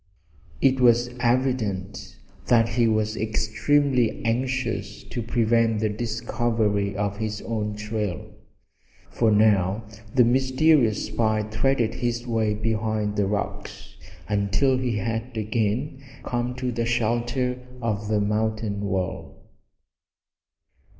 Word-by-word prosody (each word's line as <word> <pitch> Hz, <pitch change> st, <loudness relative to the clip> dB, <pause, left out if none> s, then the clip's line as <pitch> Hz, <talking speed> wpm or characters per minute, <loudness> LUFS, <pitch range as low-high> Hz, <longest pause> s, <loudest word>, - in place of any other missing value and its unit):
It 130 Hz, -1 st, +3 dB
was 120 Hz, -1 st, +4 dB
evident 120 Hz, -6 st, -1 dB, 0.3 s
that 115 Hz, -1 st, +4 dB
he 115 Hz, +1 st, +2 dB
was 110 Hz, 0 st, +1 dB
extremely 120 Hz, +4 st, +1 dB
anxious 115 Hz, -4 st, -2 dB
to 120 Hz, -, -5 dB
prevent 115 Hz, -1 st, +2 dB
the 110 Hz, 0 st, +1 dB
discovery 110 Hz, -2 st, -1 dB
of 100 Hz, 0 st, -2 dB
his 110 Hz, 0 st, -4 dB
own 105 Hz, -2 st, -3 dB
trail, 105 Hz, -2 st, -4 dB, 0.8 s
for 115 Hz, -, +2 dB
now 105 Hz, -1 st, +3 dB, 0.3 s
the 125 Hz, -, +7 dB
mysterious 130 Hz, -1 st, +3 dB
spy 110 Hz, 0 st, 0 dB
threaded 110 Hz, +2 st, 0 dB
his 120 Hz, 0 st, -2 dB
way 110 Hz, -3 st, 0 dB
behind 110 Hz, -1 st, -1 dB
rocks 100 Hz, 0 st, -3 dB, 0.3 s
until 105 Hz, +6 st, +2 dB
he 125 Hz, -4 st, -1 dB
had 115 Hz, +3 st, -3 dB
again 115 Hz, +6 st, -1 dB, 0.2 s
come 120 Hz, 0 st, -2 dB
to 130 Hz, -1 st, -2 dB
the 115 Hz, 0 st, -2 dB
shelter 120 Hz, +2 st, 0 dB, 0.2 s
of 105 Hz, -3 st, -2 dB
the 105 Hz, 0 st, +1 dB
mountain 105 Hz, 0 st, -1 dB
wall. 95 Hz, -2 st, -4 dB
110 Hz, 110 wpm, -24 LUFS, 105-120 Hz, 0.8 s, the